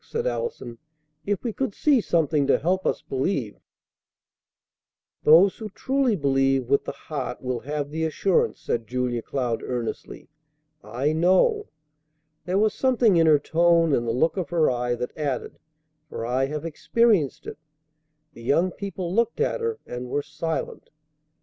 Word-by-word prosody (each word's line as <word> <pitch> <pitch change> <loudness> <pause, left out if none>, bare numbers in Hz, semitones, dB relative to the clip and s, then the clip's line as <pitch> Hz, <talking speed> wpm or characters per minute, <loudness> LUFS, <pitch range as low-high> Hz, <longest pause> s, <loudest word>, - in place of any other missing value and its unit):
said 465 +1 -4
Allison. 470 - -4 0.5
"If 205 -2 -1
we 235 -3 -2
could 265 -5 -3
see 285 -5 +3
something 155 -6 +1
to - - +4
help 185 +4 0
us - - -1
believe 130 - -2 0.8
" - - -64
"Those 175 +6 +6
who 220 -1 -6
truly 260 +2 0
believe 135 -4 +1
with 140 - +3
the - - -3
heart 135 -5 -6
will 125 -1 -2
have 145 +2 -4
the 160 +1 -1
assurance," 170 +4 +1
said 115 -2 -3
Julia 125 -1 -2
Cloud 120 -2 -2
earnestly. 120 -3 -5 0.6
"I 125 +8 -1
know." 190 - +3 0.8
There 180 +2 0
was 215 +1 +2
something 245 -6 +3
in 165 -1 +4
her 155 -1 +6
tone 165 +1 +3
and 120 -3 +1
the - - +1
look 160 +11 +1
of 175 -6 -2
her 165 -4 +2
eye 120 0 -1
that 125 +1 -5
added, 145 -5 -4 0.5
"For 115 - -5
I 130 +3 0
have 150 +2 -5
experienced 185 - +1
it." - - -8 0.7
The 115 - -13
young 165 +10 +2
people 185 -2 -5
looked 235 +2 +1
at 470 +1 0
her, 455 -1 -1
and 125 0 -6
were 145 +3 -1
silent. 155 +3 -5
155 Hz, 160 wpm, -24 LUFS, 130-195 Hz, 0.8 s, Those